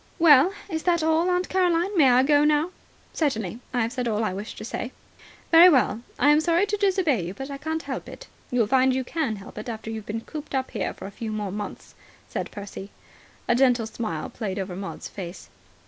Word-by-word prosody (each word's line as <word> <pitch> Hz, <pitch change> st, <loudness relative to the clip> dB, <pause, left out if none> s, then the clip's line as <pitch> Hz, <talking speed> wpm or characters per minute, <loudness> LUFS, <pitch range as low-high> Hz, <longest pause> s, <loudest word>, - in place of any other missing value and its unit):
"Well, 325 Hz, 0 st, +7 dB, 0.2 s
is 320 Hz, -5 st, -3 dB
that 340 Hz, -2 st, +1 dB
all, 320 Hz, +2 st, +2 dB
Aunt 360 Hz, 0 st, +1 dB
Caroline? 360 Hz, +1 st, +1 dB
May 290 Hz, -7 st, +6 dB
I 250 Hz, +1 st, +5 dB
go 290 Hz, +1 st, +4 dB
now?" 300 Hz, +3 st, +2 dB, 0.4 s
"Certainly. 225 Hz, -, -1 dB
I 250 Hz, -2 st, 0 dB
have 225 Hz, +1 st, 0 dB
said 250 Hz, -3 st, -2 dB
all 220 Hz, -1 st, 0 dB
I 210 Hz, -, -1 dB
wished 205 Hz, +4 st, -7 dB
to -, -, -7 dB
say." 245 Hz, +2 st, -5 dB, 0.6 s
"Very 340 Hz, +2 st, +9 dB
well. 250 Hz, -, +2 dB, 0.2 s
I'm 295 Hz, +1 st, +5 dB
sorry 340 Hz, +4 st, +3 dB
to 415 Hz, 0 st, -1 dB
disobey 370 Hz, -, +2 dB
you, 180 Hz, +3 st, -6 dB
but 270 Hz, +5 st, -6 dB
I 275 Hz, -, -6 dB
can't 320 Hz, +2 st, -3 dB
help -, -, -5 dB
it." -, -, -10 dB, 0.2 s
"You'll 245 Hz, -3 st, +2 dB
find 260 Hz, +3 st, +3 dB
you 260 Hz, -, 0 dB
can 265 Hz, -4 st, -2 dB
help 200 Hz, +1 st, -10 dB
it 215 Hz, -, -6 dB
after 220 Hz, -1 st, -5 dB
you've 220 Hz, -1 st, -6 dB
been 225 Hz, +2 st, -3 dB
cooped 300 Hz, +2 st, -7 dB
up 260 Hz, -1 st, -1 dB
here -, -, -3 dB
for -, -, -9 dB
a 195 Hz, -, -7 dB
few 220 Hz, +2 st, -5 dB
more 210 Hz, -2 st, -3 dB
months," 205 Hz, +1 st, -7 dB, 0.3 s
said -, -, -4 dB
Percy. 200 Hz, -1 st, -8 dB, 0.6 s
A -, -, +4 dB
gentle 245 Hz, -2 st, +3 dB
smile 215 Hz, -8 st, -4 dB
played 205 Hz, -5 st, -4 dB
over 190 Hz, -2 st, -4 dB
Maud's 195 Hz, +1 st, -6 dB
face. 180 Hz, -2 st, -9 dB
255 Hz, 215 wpm, -25 LUFS, 215-320 Hz, 0.6 s, Very